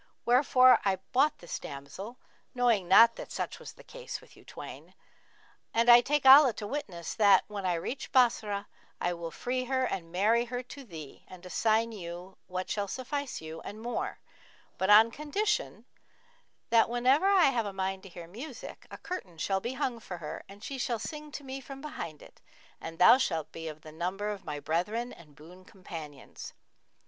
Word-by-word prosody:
Wherefore 255 +1 +6
I 195 -2 +2 0.2
bought 275 +4 +3
this 175 - -6
damsel, 145 - -8 0.4
knowing 235 -7 +2
not 230 +5 +7
that - - -8
such - - -4
was - - -10
the - - -16
case - - -7
with - - -19
you - - -18
twain; - - -10 0.8
and 235 +1 +6
I 240 0 +9
take 290 +3 0
Allah 265 -1 +9
to 210 0 -6
witness 205 - -5
that, 200 -4 +5
when 200 -3 -4
I 175 - +1
reach 185 +11 -5
Bassorah 215 -5 +2 0.3
I 175 - 0
will 170 -1 -6
free 255 +7 -3
her 260 0 0
and 170 -8 -4
marry 220 +6 +2
her 245 +1 -4
to 275 +3 -11
thee 160 - -10
and 185 -1 -13
assign 220 +4 +1
you 180 -2 -8
what 185 0 -4
shall 205 -1 -2
suffice 265 - -4
you, 160 +1 -8
and 210 - -8
more; 300 - -3 0.6
but 190 - 0
on 220 +2 +8
condition 395 - -2 0.9
that, 230 -1 +5
whenever 255 +9 +3
I 375 -8 +5
have 230 -4 -1
a - - -4
mind 190 0 -3
to 195 - -12
hear 175 -1 -9
music, 245 - -9
a - - -9
curtain 190 - -7
shall 190 +4 0
be 240 +6 -4
hung 260 -3 -2
for 185 -5 -7
her 155 -3 -6
and 200 +2 -13
she 270 +2 -5
shall 240 -1 -1
sing 300 +6 -7
to 290 - -6
me 270 0 -6
from 270 +1 -9
behind 275 - -7
it, - - -18 0.4
and 165 0 -7
thou 180 +9 +7
shalt 160 - -1
be 165 0 -7
of 155 -1 -8
the 155 -1 -11
number 185 +6 -3
of 205 -2 -6
my 150 -1 -4
brethren 210 +11 -2
and 150 -4 -16
boon 175 +5 -14
companions.' 165 -8 -10
215 Hz, 190 wpm, -30 LUFS, 175-255 Hz, 0.9 s, I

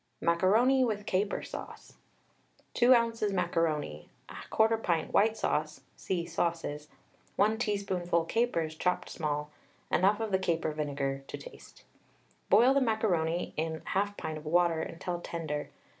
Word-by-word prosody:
MACARONI 215 +10 +3
WITH 210 -4 -1
CAPER 200 +1 0
SAUCE. - - -9 0.8
2 250 +1 +6
oz. 230 -1 +1
macaroni, 160 - -1 0.2
1/4 225 0 +1
pint 165 -5 -1
white 220 +2 +3
sauce 155 +1 -1
(see 175 -3 -2
"Sauces"); 165 -3 -2 0.5
1 215 +2 +2
teaspoonful 190 -7 0
capers 170 -7 0
chopped 180 +3 -1
small, 150 -2 -3 0.4
enough 200 +4 +3
of 220 -2 -3
the 190 - +2
caper 165 -3 0
vinegar 140 -2 -3
to - - -6
taste. - - -13 0.7
Boil 250 +3 +6
the 275 - +3
macaroni 180 -8 0
in 160 0 -2
1/2 205 +1 -1
pint 155 -1 -4
of 155 - -15
water 170 0 +3
until 175 +1 -4
tender. 155 -4 -4
175 Hz, 130 wpm, -30 LUFS, 160-215 Hz, 0.8 s, 2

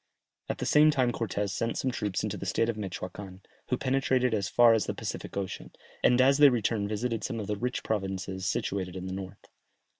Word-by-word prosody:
At - - -2
the - - -3
same 150 +1 +6
time 130 -5 +2
Cortès 105 -4 -2
sent 115 +5 -2
some 130 - 0
troops 105 -5 -2
into 105 -1 -2
the 95 -1 -6
state 115 +5 +1
of 115 - -1
Mechoacan, 95 -1 -7 0.3
who 125 - +1
penetrated 130 -2 +1
as 100 -3 0
far 120 -1 +6
as 110 - +1
the - - -2
Pacific - - -5
Ocean, 95 -2 -4 0.3
and 125 - +5
as 135 +2 +5
they 145 -1 +9
returned 110 -4 0
visited 115 +1 -2
some 115 - -3
of 105 - -4
the 105 +1 -2
rich 125 +4 -3
provinces 95 -2 -2
situated 95 -2 -2
in 95 0 -5
the 95 - -4
north. 95 0 -8
105 Hz, 210 wpm, -29 LUFS, 95-125 Hz, 0.3 s, they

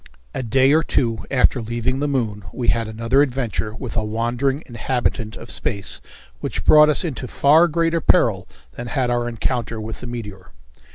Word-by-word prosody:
A - - -3
day 130 +4 +3
or 160 - +5
two 115 -7 -1
after 125 -1 +3
leaving 120 +3 -2
the 145 - 0
moon 115 -7 -2
we 120 - -1
had 115 -1 +1
another 115 +5 +1
adventure 125 -5 -2
with 125 -1 -7
a 110 - 0
wandering 120 +6 -1
inhabitant 120 -2 -2
of 115 - -10
space 100 -3 -4 0.4
which - - -4
brought 150 0 +7
us 150 - +1
into 135 -6 -4
far 155 +7 +4
greater 165 0 0
peril 105 - +3 0.2
than 120 - -7
had 125 -1 0
our 120 0 0
encounter 115 -1 -2
with 110 +1 -6
the 125 - -6
meteor. 105 -6 -8
120 Hz, 175 wpm, -21 LUFS, 115-135 Hz, 0.4 s, brought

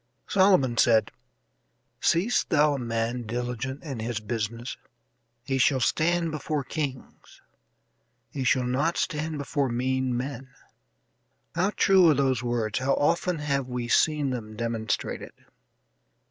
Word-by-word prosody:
Solomon 185 - +3
said: 110 -3 +4 0.9
"Seest 185 +9 +1
thou 150 -1 +4
a 140 - -3
man 115 0 -2
diligent 125 +3 -4
in 135 -7 -5
his 115 0 -3
business? 115 +3 -4 0.7
he 135 +1 -1
shall 130 +1 +3
stand 165 +6 +1
before 150 -1 -2
kings, 135 -2 -6 0.9
he 135 - -3
shall 130 0 +2
not 140 +7 0
stand 155 +1 -2
before 140 -1 -1
mean 130 +1 0
men." 130 0 -6 1.0
How 180 +4 +1
true 190 -3 +5
are 150 - +4
those 130 -3 +1
words; 120 -3 -1
how 135 +1 +1
often 170 +4 +1
have 140 -3 -1
we 125 -1 -4
seen 150 +2 +2
them 110 -4 -6
demonstrated. 115 -2 -3
130 Hz, 125 wpm, -26 LUFS, 120-150 Hz, 1.0 s, true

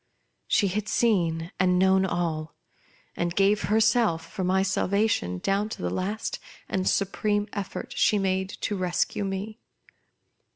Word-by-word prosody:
She 200 - +3
had 210 +3 -2
seen 175 -8 +1
and 180 0 +3
known 190 +1 +4
all, 160 -4 -2 0.6
and 170 0 -2
gave 200 +2 +3
herself 220 -6 +2
for 190 - -3
my 190 +1 +2
salvation 195 - 0
down 195 - 0
to - - -7
the 90 - -1
last 205 - -3 0.3
and 190 -1 0
supreme 205 +1 0
effort 200 -3 -5
she 210 - +3
made 190 -1 0
to 205 - -1
rescue 185 +2 -1
me. 200 +3 -4
190 Hz, 135 wpm, -26 LUFS, 180-210 Hz, 0.6 s, known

